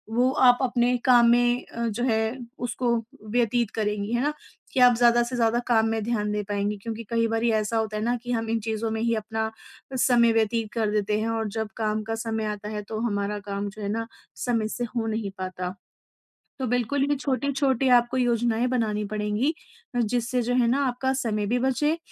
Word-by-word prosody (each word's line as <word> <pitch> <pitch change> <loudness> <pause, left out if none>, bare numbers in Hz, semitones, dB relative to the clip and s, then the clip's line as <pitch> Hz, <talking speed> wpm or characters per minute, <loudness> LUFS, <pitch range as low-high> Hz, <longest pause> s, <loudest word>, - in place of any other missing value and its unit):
वो 250 +2 +4 0.2
आप 245 0 +7
अपने 245 -1 +2
काम 240 -2 +6
में 240 +1 +3
अ, 235 0 -3
जो 230 +2 -2
है 220 +1 0 0.2
उसको 245 +1 -2 0.4
व्यतीत 235 -1 +1
करेंगी, 210 0 -1
है 240 - +1
ना? 300 +1 +1 0.4
कि - - +1
आप 245 -1 +7
ज़्यादा 240 0 +5
से 250 +1 -4
ज़्यादा 230 0 +2
काम 225 -2 +3
में 225 -1 -1
ध्यान 210 -3 -1
दे 210 0 -1
पाएँगी 205 +1 -1
क्योंकि 230 0 -5
कई 230 0 +2
बारी 225 +1 +1
ऐसा 220 +1 0
होता 215 -1 -1
है 215 - -2
ना 240 +2 +1
कि, 245 +1 -6
हम 225 -1 -1
इन 225 0 +1
चीज़ों 220 0 -2
में 220 0 -2
ही 230 0 +1
अपना 220 0 -2 0.5
समय 240 -2 +4
व्यतीत 225 0 +1
कर 220 -2 0
देते 210 0 0
हैं 225 - -1
और 225 -1 -1
जब 220 - -1
काम 215 -1 -1
का 225 +1 -3
समय 225 -1 -2
आता 210 0 -4
है 210 -1 -4
तो 220 -1 -4
हमारा 205 0 -2
काम 200 0 -2
जो 210 +2 -11
है 200 - -2
ना 225 +2 -2 0.3
समय 230 -3 0
से 245 - -3
हो 230 - 0
नहीं 215 -2 -2
पाता। 185 0 -4 0.8
तो 260 - -1
बिल्कुल 245 +3 +1
भी 290 - +2
छोटी-छोटी 270 -1 0
आपको 240 +2 0
योजनाएँ 240 -1 +1
बनानी 220 -4 0
पड़ेंगी 215 +7 0 0.4
आ, - - +2
जिससे 240 +2 0
जो 245 - -1
है 245 -2 +3
ना, 270 +4 +2
आपका 260 +2 -1
समय 220 -6 -1
भी 245 +3 +1
बचे, 295 +5 +1
230 Hz, 210 wpm, -25 LUFS, 215-245 Hz, 0.8 s, आप